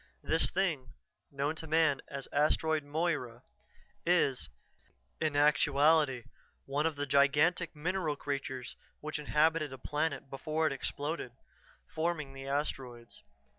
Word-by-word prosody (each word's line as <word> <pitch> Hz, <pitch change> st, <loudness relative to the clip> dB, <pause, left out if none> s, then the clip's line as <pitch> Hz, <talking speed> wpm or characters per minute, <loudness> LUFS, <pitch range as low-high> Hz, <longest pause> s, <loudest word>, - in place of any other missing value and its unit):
This 160 Hz, -, +3 dB
thing, 160 Hz, -9 st, -1 dB, 0.4 s
known 140 Hz, +2 st, -2 dB
to 160 Hz, -, -4 dB
man 155 Hz, -3 st, +3 dB
as 140 Hz, -1 st, -6 dB
Asteroid 155 Hz, +1 st, +2 dB
Moira, 145 Hz, -6 st, -2 dB, 0.6 s
is, 170 Hz, -7 st, +2 dB, 0.7 s
in 155 Hz, -2 st, 0 dB
actuality, 145 Hz, -2 st, +4 dB, 0.4 s
one 145 Hz, +3 st, 0 dB
of 160 Hz, -, -3 dB
the 145 Hz, 0 st, -2 dB
gigantic 145 Hz, +5 st, +3 dB
mineral 165 Hz, 0 st, -1 dB
creatures 135 Hz, -3 st, -4 dB, 0.2 s
which 155 Hz, 0 st, -4 dB
inhabited 155 Hz, 0 st, +2 dB
a 130 Hz, -, -7 dB
planet 150 Hz, +1 st, -2 dB
before 155 Hz, +4 st, -2 dB
it 155 Hz, -, +2 dB
exploded, 145 Hz, -1 st, -3 dB, 0.5 s
forming 160 Hz, -4 st, -2 dB
the 135 Hz, 0 st, -8 dB
asteroids. 130 Hz, -4 st, -4 dB
150 Hz, 120 wpm, -32 LUFS, 135-160 Hz, 0.7 s, actuality